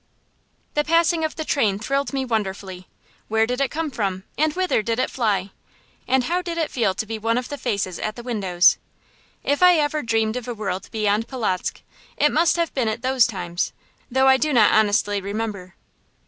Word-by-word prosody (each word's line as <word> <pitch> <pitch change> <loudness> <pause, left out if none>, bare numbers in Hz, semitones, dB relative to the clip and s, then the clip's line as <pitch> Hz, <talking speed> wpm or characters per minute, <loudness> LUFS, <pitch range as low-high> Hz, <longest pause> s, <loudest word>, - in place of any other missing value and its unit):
The 295 - +1
passing 330 +1 +2
of 315 - -2
the 315 - -4
train 215 -11 +1
thrilled 275 +6 -1
me 270 -1 -2
wonderfully. 195 -5 -3 0.4
Where 220 0 +2
did 250 +3 -2
it 275 - +2
come 315 -1 -3
from, 195 -5 -2
and 310 +1 +2
whither 370 -9 +1
did 230 +1 -2
it 255 - 0
fly, 205 -5 0 0.6
and 260 -1 +3
how 350 +7 0
did 340 -2 -5
it 320 -2 -1
feel 215 -7 0
to 220 - -3
be 220 0 -5
one 230 +2 0
of 250 - -3
the 290 - -5
faces 200 -7 -2
at 215 0 -3
the 240 - -9
windows? 190 -7 +3 0.6
If 285 +3 0
ever 310 -4 +4
I - - -3
dreamed 225 -1 0
of 250 - -6
a 240 - -4
world 195 -3 -4
beyond 215 +1 0
Polotzk, 220 -9 -2 0.4
it 295 - +3
must 330 +1 +3
have 335 -2 -1
been 255 -4 0
at 220 +2 -3
those 260 -2 +4
times, 175 -5 -3 0.4
though 265 +1 +3
I 265 0 +6
do 305 +3 0
not 225 -6 +5
honestly 205 -1 +2
remember. 200 -2 -5
230 Hz, 200 wpm, -22 LUFS, 205-280 Hz, 0.6 s, I